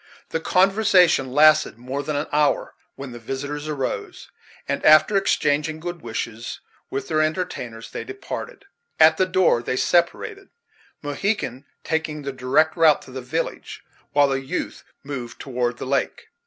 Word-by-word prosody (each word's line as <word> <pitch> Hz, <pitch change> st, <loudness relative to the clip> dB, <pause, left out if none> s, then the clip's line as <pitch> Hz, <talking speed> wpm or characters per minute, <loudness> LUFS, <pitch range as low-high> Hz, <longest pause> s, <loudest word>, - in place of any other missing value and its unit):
The 160 Hz, -, -1 dB
conversation 185 Hz, -6 st, +3 dB
lasted 155 Hz, 0 st, +5 dB
for -, -, -25 dB
more 130 Hz, +3 st, -3 dB
than 150 Hz, +1 st, -3 dB
an 145 Hz, +2 st, -1 dB
hour, 150 Hz, -1 st, +1 dB, 0.2 s
when 135 Hz, -2 st, -8 dB
the 120 Hz, -, -9 dB
visitors 140 Hz, +5 st, -5 dB
arose, 140 Hz, -4 st, -4 dB, 0.4 s
and, 140 Hz, -, -2 dB
after 155 Hz, +7 st, +6 dB
exchanging 155 Hz, -5 st, +1 dB
good 175 Hz, 0 st, -6 dB
wishes 115 Hz, 0 st, -5 dB, 0.3 s
with 135 Hz, -, -4 dB
their 155 Hz, -1 st, +1 dB
entertainers, 155 Hz, -9 st, -3 dB
they -, -, -5 dB
departed. 400 Hz, +3 st, -7 dB, 0.3 s
At 155 Hz, 0 st, +7 dB
the 185 Hz, -, +2 dB
door 185 Hz, -10 st, +3 dB
they 125 Hz, +1 st, -2 dB
separated, 385 Hz, -, 0 dB, 0.5 s
Mohegan 145 Hz, -, -2 dB, 0.2 s
taking 160 Hz, -2 st, -2 dB
the 140 Hz, -, -3 dB
direct 135 Hz, +5 st, +2 dB
route 160 Hz, -4 st, +4 dB
to -, -, -13 dB
the 130 Hz, 0 st, -6 dB
village, 150 Hz, +7 st, -4 dB, 0.3 s
while 145 Hz, -1 st, +4 dB
the 135 Hz, 0 st, -1 dB
youth 135 Hz, -, -4 dB, 0.2 s
moved 130 Hz, -4 st, -6 dB
toward 120 Hz, -2 st, -2 dB
the -, -, -6 dB
lake. 135 Hz, +1 st, -2 dB
145 Hz, 155 wpm, -23 LUFS, 130-165 Hz, 0.5 s, At